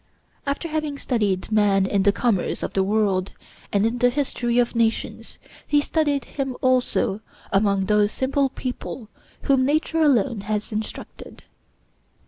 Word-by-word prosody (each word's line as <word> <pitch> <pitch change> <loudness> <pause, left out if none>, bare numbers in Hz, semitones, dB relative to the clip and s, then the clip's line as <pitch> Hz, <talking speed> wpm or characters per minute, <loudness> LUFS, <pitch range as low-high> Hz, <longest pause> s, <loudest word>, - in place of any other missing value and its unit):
After 280 +4 -2
having 305 -2 -2
studied 210 -8 -1
man 205 -2 +3
in 195 0 +1
the 200 +1 +4
commerce 205 -3 0
of - - -3
the 195 - +2
world, 195 -2 +1 0.4
and 200 +1 +2
in 235 +2 -1
the 245 0 +4
history 245 -3 -1
of 240 0 +2
nations, 230 -1 -1 0.3
he 295 - +3
studied 290 -2 0
him 270 -3 -4
also 250 -5 +1 0.3
among 200 -1 +2
those 210 +1 +3
simple 270 +2 0
people 250 -3 -6 0.3
whom 270 -2 +3
nature 310 +3 +1
alone 250 -7 +2
has 210 +1 -3
instructed. 215 0 -7
235 Hz, 140 wpm, -23 LUFS, 205-275 Hz, 0.4 s, the